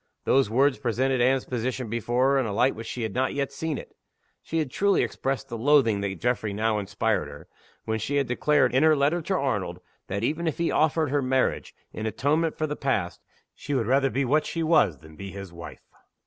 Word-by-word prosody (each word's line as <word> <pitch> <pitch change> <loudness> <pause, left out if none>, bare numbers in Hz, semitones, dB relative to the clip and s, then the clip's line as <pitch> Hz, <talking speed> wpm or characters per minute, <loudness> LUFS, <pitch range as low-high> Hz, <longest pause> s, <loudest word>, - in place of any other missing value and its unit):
Those 135 -5 +3
words 135 +4 +2
presented 130 0 0
Anne's 130 +1 +2
position 125 0 -3
before 120 +4 +1
her 140 - +3
in 130 - 0
a - - -3
light 125 +6 +3
in - - -11
which 115 0 -7
she 120 - -4
had 110 -3 -3
not 130 +3 +1 0.2
seen 150 +1 -3
it - - -9
yet. - - -33 0.5
She 165 - -4
had 155 -5 -1
truly 200 +4 +2
expressed 135 0 -3
the 115 -3 -6
loathing 120 -6 +3
that 95 -3 -3
Geoffrey 120 -4 -1
now 110 +1 0
inspired 105 -2 -1
in 75 - -9
her, - - -14 0.4
when 110 0 -1
she 140 +7 -2
had 140 -1 +2
declared, 145 +4 +2
in 130 - +3
her 155 0 +5
letter 150 +5 +1
to 190 +4 -1
Arnold, 110 - -1 0.3
that, 100 +3 -3
even 160 +7 -1
if 160 - -1
he 170 - 0
offered 155 -1 +2
her 145 0 +2
marriage, 130 0 0 0.2
in 110 - -4
atonement 155 +8 0
for 155 - 0
the 150 -1 -3
past, 110 -12 -2 0.3
she 145 - -4
would 120 -4 +1
rather 135 +3 +3
be 135 +1 0
what 150 +5 +2
she 165 - -2
was 155 - +3
than 80 +3 -15
be 100 +4 -8
his 95 -2 -9
wife. 85 0 -10
130 Hz, 230 wpm, -26 LUFS, 110-145 Hz, 0.5 s, her